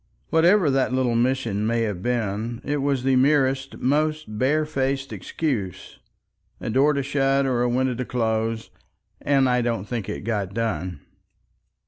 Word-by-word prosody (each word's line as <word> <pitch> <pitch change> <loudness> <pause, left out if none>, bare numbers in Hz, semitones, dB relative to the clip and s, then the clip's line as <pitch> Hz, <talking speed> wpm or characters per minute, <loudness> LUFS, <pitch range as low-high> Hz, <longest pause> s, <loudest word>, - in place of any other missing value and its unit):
Whatever 170 0 +4
that 135 -1 +1
little 130 -2 +1
mission 115 -4 0
may 115 0 +1
have 105 -5 -3
been 115 0 -2
it 145 0 0
was 140 -2 0
the 135 0 +3
merest, 135 0 +2
most 150 -4 0
barefaced 135 -1 0
excuse, 115 - -4 0.6
a - - -4
door 140 +6 +4
to 140 -1 -1
shut, 135 0 +1
or 125 -2 +1
a 125 - +2
window 130 +1 +1
to 125 +1 -4
close, 115 -1 -1 0.5
and 135 -2 +3
I 125 0 +2
don't 115 -5 -1
think 115 -5 -4
it - - -4
got 100 -3 -2
done. 90 -8 -2
130 Hz, 150 wpm, -24 LUFS, 115-135 Hz, 0.6 s, Whatever